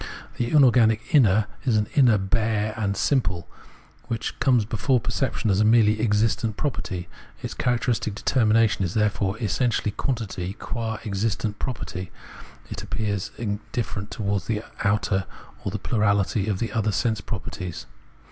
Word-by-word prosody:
The 120 - -1
inorganic 120 -5 +4
inner 110 -7 +5 0.2
is 120 -5 +2
an 105 - +2
inner 125 -6 +5
bare 110 +1 0
and 100 -3 -1
simple, 95 - +1 0.6
which 115 -1 -3
comes 125 -5 +3
before 120 +4 +1
perception 115 -2 -1
as 95 - +2
a - - +5
merely 110 -1 +4
existent 110 0 +1
property. 95 -11 -3 0.4
Its - - -4
characteristic 120 -3 0
determination 110 -3 +3
is 90 -1 -2
therefore 105 -2 +1
essentially 110 +1 0
quantity, 110 -6 -3
and 95 +4 -6
qua 115 -2 -3
existent 105 +1 -1
property 95 -7 -4 0.6
it - - -5
appears 105 -3 -2
indifferent 105 -1 -4
towards 100 -2 -2
the 110 -1 -1 0.2
outer, 100 -2 +1 0.4
or - - -1
the 105 - -3
plurahty 100 -1 +1
of 105 0 -1
other 110 -1 +1
sense 110 +2 0
properties. 90 -4 -6
110 Hz, 140 wpm, -25 LUFS, 100-115 Hz, 0.6 s, inner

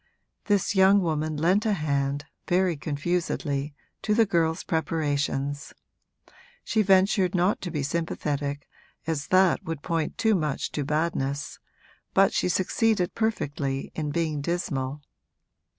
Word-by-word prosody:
This 205 -1 +1
young 190 +1 +6
woman 155 -3 -1
lent 180 +7 +2
a 220 - +1
hand, 145 -3 -1 0.2
very 180 -1 +2
confusedly, 145 -1 -2 0.3
to 210 - +1
the 225 0 +5
girl's 165 -4 +1
preparations; 145 -3 -1 0.9
she 220 - +1
ventured 190 -1 +3
not 180 +3 +2
to 180 - -4
be 150 -4 -2
sympathetic, 145 -2 -2 0.4
as 155 -2 -2
that 185 -1 +4
would 160 -3 -5
point 165 -3 -2
too 220 -1 +3
much 155 -7 -1
to 145 - -2
badness, 145 -2 -2 0.6
but 195 0 +5
she - - +1
succeeded 190 +2 +1
perfectly 145 -11 -2
in 155 -2 -3
being 155 -1 -1
dismal. 145 -4 -2
160 Hz, 125 wpm, -26 LUFS, 145-185 Hz, 0.9 s, young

